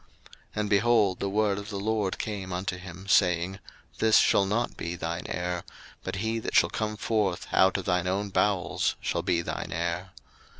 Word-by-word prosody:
01:015:004 - - -31 0.5
And, 105 -1 -1
behold, 105 -2 +3
the 100 - -1
word 100 0 +1
of 100 +1 -8
the 100 -2 -4
LORD 105 -2 0
came 100 -3 -4
unto 90 +1 -2
him, 90 +1 -10
saying, 90 -1 +3 0.4
This 110 -1 +5
shall 100 - +4
not 115 +5 -1
be 85 +1 -4
thine 85 0 -4
heir; 90 0 -2 0.4
but - - -4
he 110 +3 -1
that - - -4
shall - - +5
come 105 -1 -2
forth 105 -4 0
out 95 +1 +4
of 95 - -5
thine 90 -1 +1
own 100 +2 -1
bowels 100 -1 +1
shall - - -1
be 85 -1 +1
thine - - -4
heir. 85 +2 -2
95 Hz, 185 wpm, -28 LUFS, 90-105 Hz, 0.5 s, This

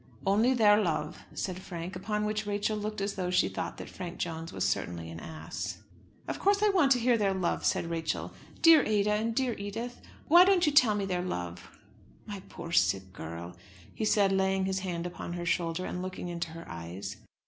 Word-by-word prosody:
"Only 220 +7 +4
their 210 -2 +6
love," 155 -5 -2
said 185 -1 -3
Frank; 175 0 -6
upon 210 +3 -2
which 215 0 -2
Rachel 205 +1 0
looked 210 0 -4
as 200 0 -1
though 180 -2 -2
she 180 - +3
thought - - -4
that - - -7
Frank 175 -2 -7
Jones 165 -1 -4
was - - 0
certainly 85 -1 -2
an 85 - -7
ass. 160 - -6 0.4
"Of - - -3
course 405 +1 +3
I 425 - +5
want 360 -9 +4
to 250 - 0
hear 240 -1 +3
their 195 -2 +2
love," 185 -2 -1
said - - +1
Rachel. 165 -1 -3 0.3
"Dear 330 -3 +8
Ada, 210 -1 +2
and 220 +2 0
dear 255 -2 +1
Edith! 225 +5 -5 0.3
Why 345 +4 +9
don't 370 -1 +4
you 300 - +3
tell 255 -8 +5
me 200 -1 -1
their 180 -2 -1
love?" 90 - -5 0.5
"My 205 -2 -6
poor 170 -1 -8
sick 95 - +2
girl," 85 +2 -7 0.4
he - - -4
said, 205 -2 +3
laying 190 0 +2
his 190 0 0
hand 175 -3 -3
upon 175 -1 -5
her 175 0 -4
shoulder, 170 +1 0
and 180 - -4
looking 185 -1 -5
into 170 -1 -3
her 165 +1 -9
eyes. 90 +5 -6
190 Hz, 205 wpm, -30 LUFS, 170-215 Hz, 0.5 s, Why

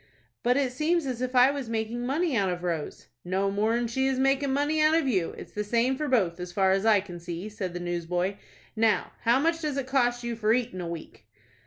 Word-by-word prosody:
"But 245 +2 +2
it 270 -3 +1
seems 315 +5 0
as 250 -2 -3
if 255 0 -2
I 250 +2 +7
was 280 -4 -5
making 230 +2 -2
money 305 +2 0
out 195 -4 +2
of 175 0 -4
Rose." 165 -4 -3 0.2
"No 190 +2 0
more'n 220 +4 +1
she 265 +3 0
is 265 -1 0
making 270 +1 +2
money 290 +3 +1
out 310 +1 +5
of 325 -4 +2
you. 190 -9 0
It's - - -10
the 210 - -3
same 235 +5 +1
for 300 +3 -3
both, 190 -10 +1
as 180 0 -6
far 190 0 +2
as 195 +3 +1
I 210 -3 +5
can 180 -3 -9
see," 170 +4 -6
said 195 -5 -5
the - - -3
newsboy. 175 +2 -2 0.4
"Now, 220 -1 +2
how 235 +3 +3
much 330 +3 +1
does 300 -3 -2
it 275 - -1
cost 245 -2 +1
you 235 -1 -3
for 220 0 +2
eatin' 230 -7 -1
a 175 - -4
week?" 170 -1 -8
230 Hz, 235 wpm, -27 LUFS, 190-265 Hz, 0.4 s, I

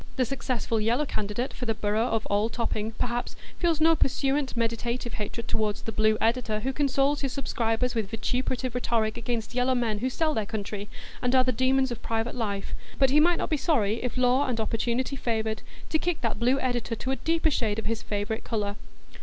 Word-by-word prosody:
The 255 - +2
successful 235 -3 -1
Yellow 240 +7 +2
candidate 215 +1 -2
for 250 - -5
the 225 - +1
borough 215 +3 +1
of 225 -2 0
Old 210 +3 +1
Topping, 225 -2 -2
perhaps, 240 +2 -2 0.2
feels 335 -3 +2
no 325 +1 +6
pursuant 275 -2 +1
meditative 235 +1 -1
hatred 220 +2 -4
toward 215 -1 +1
the 225 - -6
Blue 215 0 +3
editor 225 -2 +1
who 265 +3 -1
consoles 280 0 +2
his 275 -2 -1
subscribers 245 -3 0
with 220 -4 -1
vituperative 250 +2 -1
rhetoric 230 -3 0
against 235 -1 -3
Yellow 250 +1 +2
men 225 -4 0
who 255 +4 0
sell 310 +4 +1
their 215 -5 -1
country, 205 -1 -4 0.3
and 250 +1 +2
are 255 - +6
the 255 - +2
demons 260 +2 +2
of 240 - -5
private 225 +1 -1
life; 205 -5 -3 0.2
but 270 -1 +4
he 295 - +6
might 345 +2 +5
not - - -3
be 310 - +3
sorry, 235 -7 +1
if 250 0 -2
law 255 +2 +3
and 240 -3 -1
opportunity 235 +4 0
favoured, 220 -3 -1 0.3
to 315 - +2
kick 350 -1 -1
that 230 -3 -1
Blue 255 +3 +3
editor 245 -3 -1
to 260 +4 -3
a - - +1
deeper 325 -1 +1
shade 220 -6 0
of 225 - -3
his 225 0 -1
favourite 205 +1 -2
colour. 205 -2 -2
240 Hz, 205 wpm, -27 LUFS, 220-260 Hz, 0.3 s, no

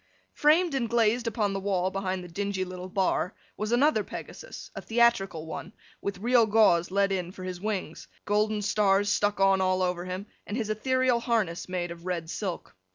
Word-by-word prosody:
Framed 315 +2 +3
and 245 -4 0
glazed 235 0 +2
upon 210 -3 0
the 195 - -2
wall 190 -2 0
behind 190 -1 -2
the - - -8
dingy 195 +2 -2
little 185 0 -7
bar, 185 -1 0 0.2
was 215 +1 -3
another 285 +6 +3
Pegasus—a - - -8
theatrical 225 -8 +2
one—with 190 +4 -7
real 235 +2 +4
gauze 205 -6 +4
let 200 +1 +2
in 180 -2 -2
for 185 - -10
his 180 -1 -5
wings, 200 -6 -4 0.2
golden 210 0 +1
stars 205 0 +2
stuck 205 0 +1
on 195 0 +4
all 185 0 +2
over 180 -1 -1
him, 185 +2 -5 0.2
and 205 - -3
his 220 -3 -1
ethereal 255 +2 +2
harness 215 -8 -1
made 175 -1 -2
of 170 +1 -9
red 170 -2 -3
silk. 185 - -5
200 Hz, 175 wpm, -28 LUFS, 185-225 Hz, 0.2 s, real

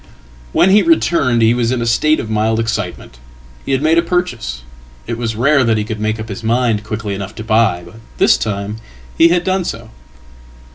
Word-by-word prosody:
"When 190 - +3
he 210 +2 +6
returned 140 - +2
he 115 +1 +4
was 120 -1 0
in 130 - -1
a 120 - -2
state 155 +7 +2
of - - -5
mild 110 +1 0
excitement. 100 - -4 0.4
He - - -4
had 135 +1 0
made 160 +2 +4
apurchase. 165 - -2 0.4
It 115 - -3
was 115 -1 -3
rare 140 +4 +3
that 115 -2 +2
he 105 - -1
could 110 0 -5
make 110 +1 -2
up 110 - -6
his 100 +3 -7
mind 115 -2 +1
quickly 105 -1 -4
enough 100 +1 -6
tobuy, 110 -5 +1
but 95 +6 -14 0.2
this - - +4
time 105 0 -4 0.4
he 165 - +6
had 175 +1 +1
done 190 0 0
so." 115 -8 -6
115 Hz, 195 wpm, -16 LUFS, 110-135 Hz, 0.4 s, he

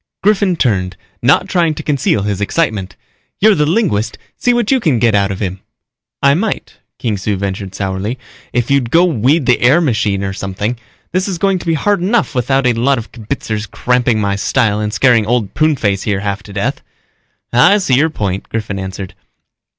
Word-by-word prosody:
Griffin 200 -2 +3
turned, 95 - 0 0.2
not 140 +9 +3
trying 170 -5 +1
to - - -6
conceal 135 -8 +1
his 100 -1 -2
excitement. 105 - -1 0.4
"You're 215 +1 +5
the 150 -5 +1
linguist, 155 - 0 0.2
see 245 - +1
what 240 -1 +1
you 265 - +4
can 155 - +1
get 115 -1 +2
out 100 -1 +2
of 95 0 -4
him." 95 -1 -3 0.6
"I 140 0 +6
might," 195 +7 -3 0.2
Kung 110 -4 -1
Su 100 +1 -1
ventured 95 0 -4
sourly, 100 +5 -3 0.3
"if 120 +2 -1
you'd 135 -4 +2
go 170 +7 +4
weed 145 -1 +2
the 125 - +2
air 135 +7 +5
machine 105 - 0
or 95 -1 -3
something. 100 +4 -3 0.4
This 185 +2 0
is 190 -3 -3
going 195 +1 +1
to 175 - -9
be 165 - +2
hard 200 +4 +1
enough 215 +3 +1
without 135 +1 +1
a 125 - +4
lot 130 +4 +1
of 115 - -7
kibitzers 110 -2 -4
cramping 125 +2 +1
my 100 -1 0
style 105 -1 +1
and 105 0 -2
scaring 120 -2 +3
Old 120 -4 0
Pruneface 125 -11 +1
here 100 -3 -1
half 100 -1 -3
to 100 - -13
death." 100 0 -2 0.7
"I 175 - +6
see 185 -10 0
your 145 +6 +4
point," 100 -10 -3
Griffin 105 -3 -3
answered. 95 0 -6
120 Hz, 190 wpm, -15 LUFS, 100-160 Hz, 0.7 s, I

